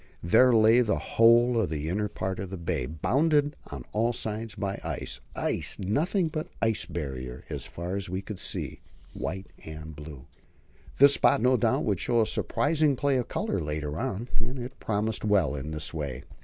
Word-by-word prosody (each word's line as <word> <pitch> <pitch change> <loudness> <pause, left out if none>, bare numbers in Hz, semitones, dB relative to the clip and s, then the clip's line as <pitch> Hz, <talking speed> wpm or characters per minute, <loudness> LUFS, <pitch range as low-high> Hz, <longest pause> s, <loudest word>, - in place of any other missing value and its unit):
There 125 +9 +5
lay 115 +1 +6
the 110 -4 +1
whole 115 +1 +4
of 95 - -1
the 75 -1 -3
inner 105 +5 0
part 95 -2 -4
of 95 - -4
the 95 - -5
bay, 80 -7 -2
bounded 145 - +1
on 70 -4 -8
all 115 +3 +1
sides 110 -1 -4
by 100 -1 -3
ice, - - -4 0.2
ice - - 0
and 95 +1 -4
nothing 170 - +1
but 155 0 -4
ice 110 -1 0
Barrier 65 -7 -5
as - - -4
far 85 +3 -5
as 100 -2 -4
we 95 +1 -2
could 100 -1 -7
see, - - -3 0.3
white 95 +3 -4 0.2
and 80 0 -8
blue. 75 -3 -10 0.7
This 140 +1 +8
spot - - +4
would - - -3
no 130 +1 +5
doubt 110 -4 +1
show 120 - +1
a 110 - +4
surprising 150 +4 +1
play 140 +1 +1
of 125 - -1
colour 100 - -1
later 75 0 -3
on; 105 +5 -3
it 120 +2 -5
promised 110 +1 -1
well 100 -8 +3
in 70 +1 -5
this 75 0 -4
way. 70 -5 -4
105 Hz, 185 wpm, -28 LUFS, 80-120 Hz, 0.7 s, This